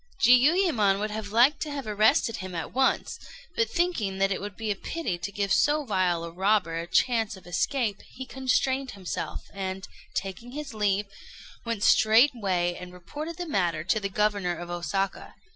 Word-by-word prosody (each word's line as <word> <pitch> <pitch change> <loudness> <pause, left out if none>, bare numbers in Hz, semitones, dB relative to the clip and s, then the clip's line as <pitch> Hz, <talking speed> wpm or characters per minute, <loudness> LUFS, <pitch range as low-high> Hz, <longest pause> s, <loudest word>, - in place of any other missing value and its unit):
Jiuyémon 250 - +4
would 210 +1 -2
have 215 -1 -4
liked 250 +6 +4
to 310 - -3
have 280 -2 -5
arrested 215 +2 +2
him 185 -1 -7
at 165 - -5
once; 265 +1 +1 0.4
but 460 0 +1
thinking 340 - 0
that 195 0 +2
it 185 - -2
would 205 -1 -7
be 220 -2 -2
a - - 0
pity 195 - -4
to 175 +4 -4
give 200 0 0
so 295 0 +2
vile 185 -6 +1
a 170 - -6
robber 185 -2 +1
a 170 - -5
chance 225 +1 +1
of 190 - -16
escape, 210 +4 -1
he 260 +1 -10
constrained 265 0 0
himself, 185 -3 -4
and, 190 -1 -4 0.3
taking 230 +6 -5
his 295 -3 -6
leave, 205 -1 +1 0.6
went 230 -3 -2
straightway 215 -8 +4
and 180 0 -9
reported 300 - -7
the 355 - -4
matter 175 - 0
to 195 +5 +1
the 200 -1 -3
Governor 205 -3 0
of 175 0 -7
Osaka. 175 +3 -3
210 Hz, 175 wpm, -27 LUFS, 185-255 Hz, 0.6 s, Jiuyémon